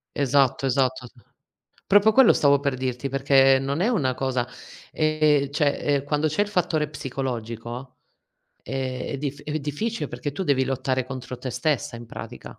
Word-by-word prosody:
Esatto, 135 -1 +2
esatto. 130 -1 0 0.8
Proprio, 205 +2 +5
quello 265 0 +7
stavo 140 -1 +4
per 140 -2 -1
dirti, 130 +1 -3
perché 135 0 +4
non 140 +5 -2
è 215 - +2
una 140 - +1
cosa 130 -1 -1 0.4
ehm, 155 -2 +2
cioè, 145 0 +2
ehm, 140 -2 0
quando 150 +1 0
c'è 155 +7 -1
il 205 - +1
fattore 165 -6 0
psicologico, 125 -3 -5 0.7
eh, 130 -1 -3
è 140 - -3
dif 145 0 -5
è 155 +1 -3
difficile 150 +5 -3
perché 130 +4 -5
tu 170 - -5
devi 130 -4 +2
lottare 130 -1 -1
contro 130 -1 -7
te 130 0 -5
stessa 125 -1 -1
in 115 0 -10
pratica. - - -9
135 Hz, 160 wpm, -24 LUFS, 130-150 Hz, 0.8 s, quello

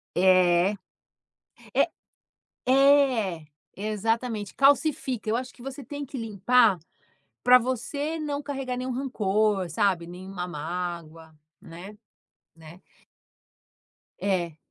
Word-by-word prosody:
É. 185 +1 +4 1.0
Eh - - +2 0.8
É. 260 - +4 0.3
Exatamente, 215 +1 -2
calcifica. 275 -4 +2
Eu 220 - +2
acho 255 +1 -4
que - - -17
você 270 +2 -7
tem 285 +3 -6
que 275 0 -8
limpar 225 -1 +3 0.6
para 250 0 +7
você 280 +6 -3
não 290 -2 -3
carregar 270 -3 -4
nenhum 255 +1 -3
rancor, 210 -6 0
sabe, 170 0 +1
nenhuma 180 +1 -7
mágoa. 165 -1 -6 0.2
Né? 175 +5 -11 0.6
Né? 165 +2 -14 1.4
É. 175 -5 -1
215 Hz, 100 wpm, -26 LUFS, 180-260 Hz, 1.4 s, para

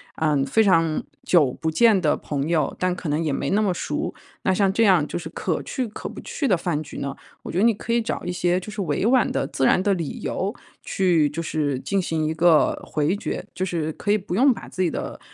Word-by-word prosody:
呃， 155 -2 +1
非 220 - +3
常 165 -5 +2 0.2
久 150 -8 +3
不 160 - 0
见 210 +3 +4
的 155 -3 +2
朋 145 +1 -3
友， 165 -2 +1
但 180 -1 +1
可 175 - -5
能 150 +3 0
也 155 - 0
没 - - -2
那 210 +2 +3
么 200 - +2
熟。 - - -3 0.3
那 - - +1
像 195 0 +2
这 225 +1 +3
样， 180 -7 +4
就 - - -4
是 175 - -7
可 - - -2
去 260 -2 -3
可 215 - -7
不 - - -9
去 280 - -3
的 190 -6 +3
饭 165 -3 -2
局 150 - -9
呢， 140 0 -3 0.3
我 - - -6
觉 175 - -3
得 - - +3
你 230 -1 +5
可 230 +3 -3
以 235 - +3
找 225 - -3
一 180 - -3
些， 180 0 +1
就 210 +3 -9
是 210 - -4
委 185 - -1
婉 250 +1 +4
的、 - - -1
自 135 - -1
然 180 - +4
的 200 - +3
理 170 -6 -4
由 195 +3 -2 0.3
去 170 -6 +2
就 155 +3 -4
是 150 -4 -1
进 195 -1 0
行 160 -3 -1
一 155 - 0
个 165 -1 +3
回 150 +5 0
绝。 205 - -4
就 185 - -2
是 165 -4 -2
可 205 - -6
以 210 - +4
不 185 -3 -6
用 265 +4 +5
把 - - -10
自 185 - -4
己 180 - +2
的， - - -5
175 Hz, 275 characters per minute, -23 LUFS, 155-200 Hz, 0.3 s, 你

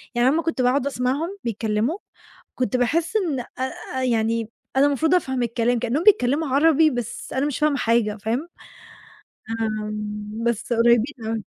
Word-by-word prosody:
يعني 240 +1 +3
أنا 275 - +4
أمّا 330 - 0
كنت 325 -6 -1
باقعد 260 +2 +2
أسمعهم 285 +9 -2
بيتكلموا، 225 - -1 0.6
كنت 250 -2 0
باحس 330 - 0
إن 325 -11 0 0.6
آآ 260 - -1
يعني 230 -2 0 0.3
أنا 275 +2 +5
المفروض 310 +4 +2
أفهم 265 -8 0
الكلام 235 +1 0
كإنهم 245 +6 0
بيتكلموا 310 - +4
عربي 310 +3 +4
بس 245 -4 -5
أنا 270 +2 0
مش 290 - -2
فاهمة 300 -1 +2
حاجة 225 -3 +1
فاهم؟ 230 +10 -3 1.1
آمم، 210 0 -4
بس 235 0 -1
قريبين 235 +3 +3
أوي. 220 -2 -3
250 Hz, 150 wpm, -23 LUFS, 225-290 Hz, 1.1 s, أنا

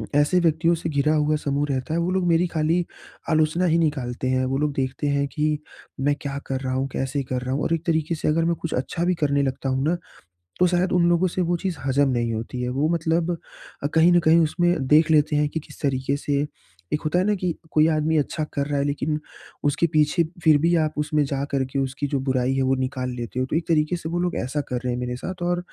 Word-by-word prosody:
ऐसे 145 +5 +4
व्यक्तियों 165 0 +2
से 165 0 -4
घिरा 150 +1 +2
हुआ 150 0 +2
समूह 145 -1 -1
रहता 130 +3 -2
है 170 - +1
वो 175 +2 0
लोग 185 -1 +1
मेरी 170 +1 +3
खाली 165 +1 0 0.4
आलोचना 155 +3 +2
ही 165 -1 +3
निकालते 130 -6 -1
हैं। 130 0 +1
वो 135 +1 -1
लोग 150 0 0
देखते 135 +2 -2
हैं 140 0 +1
कि 150 0 +1 0.4
मैं 145 +1 +2
क्या 140 -1 -4
कर 135 -1 -2
रहा 130 -1 -2
हूँ? 135 +1 0
कैसे 135 +2 -2
कर 125 0 -3
रहा 130 +1 -3
हूँ? 145 - -1
और 165 - 0
एक 165 0 -2
तरीके 160 0 0
से - - -3
अगर 165 +2 +2
मैं 170 0 +1
कुछ 165 - -3
अच्छा 165 +7 -2
भी 180 0 +2
करने 140 -1 +2
लगता 135 0 -2
हूँ 130 +1 0
ना, 175 - +1 0.6
तो 180 - +6
शायद 180 +1 +1
उन 175 -1 +3
लोगों 175 +2 +3
से 185 - -3
वो 175 0 +1
चीज़ 180 -1 -3
हजम 135 +1 +3
नहीं 120 -2 0
होती 115 +3 -4
है। 125 - -1
वो 140 +5 0
मतलब 165 +1 +1 0.5
अ, 145 - +1
कहीं 165 +2 +6
न 175 - +6
कहीं 165 0 +5
उसमें 175 -2 +1
देख 155 +3 +5
लेते 150 -1 +3
हैं 150 0 +2
कि 160 - -4
किस - - -15
तरीके 135 -1 0
से 145 0 -1 0.5
एक 150 - +1
होता 155 +4 +1
है 185 - +2
ना 210 0 +2
कि 180 -3 -1 0.2
कोई 155 0 +4
आदमी 155 +1 +1
अच्छा 155 +1 0
कर 140 0 -1
रहा 145 -1 -1
है 140 - +1
लेकिन 150 +1 -1 0.4
उसके 145 +4 +2
पीछे 155 +3 +3 0.2
फिर 155 -2 +6
भी 170 +3 +2
आप 155 - -3
उसमें 150 0 +1
जा 140 0 -2
करके 135 0 -1
उसकी 135 +1 -2
जो 140 -2 -1
बुराई 130 0 +1
है 135 - +1
वो 130 0 +2
निकाल 130 -1 -2
लेते 120 +1 -4
हो। 130 - 0
तो 155 - -1
एक 165 - -1
तरीके 155 +2 +2
से 160 -1 -6
वो 175 +1 -2
लोग 180 0 -1
ऐसा 135 +4 -2
कर 125 - -2
रहे 125 - 0
हैं 125 - -3
मेरे 125 0 -3
साथ। 180 +7 -6
और 175 0 +1
150 Hz, 255 wpm, -23 LUFS, 135-165 Hz, 0.6 s, तो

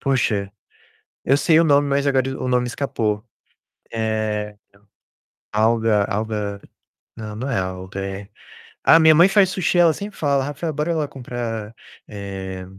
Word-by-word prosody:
Poxa, 110 -7 0 0.7
eu 135 - +4
sei 160 +1 +4
o - - +5
nome, 145 -2 +3
mas 140 0 0
agora 135 -2 +2
o - - -3
nome 125 -1 +1
escapou. 110 -5 -2 0.7
É 110 -2 -2 1.0
alga 110 -1 +2
alga. 105 -1 -3 0.6
Não, 110 -1 -7
não 130 +6 -4
é - - 0
alga, 95 +1 -4
é 100 +1 -7 0.5
ah, 165 - +7
minha 160 0 +7
mãe 170 +5 +6
faz 195 -1 +4
sushi, 180 -1 0
ela 170 -2 +5
sempre 205 +4 -8
fala: 140 -3 +1
"Rafael, 150 +3 -4
bora 155 +3 -1
lá 155 -2 -1
comprar, 120 -5 -6 0.3
eh 95 -2 -7
115 Hz, 145 wpm, -21 LUFS, 105-145 Hz, 1.0 s, ah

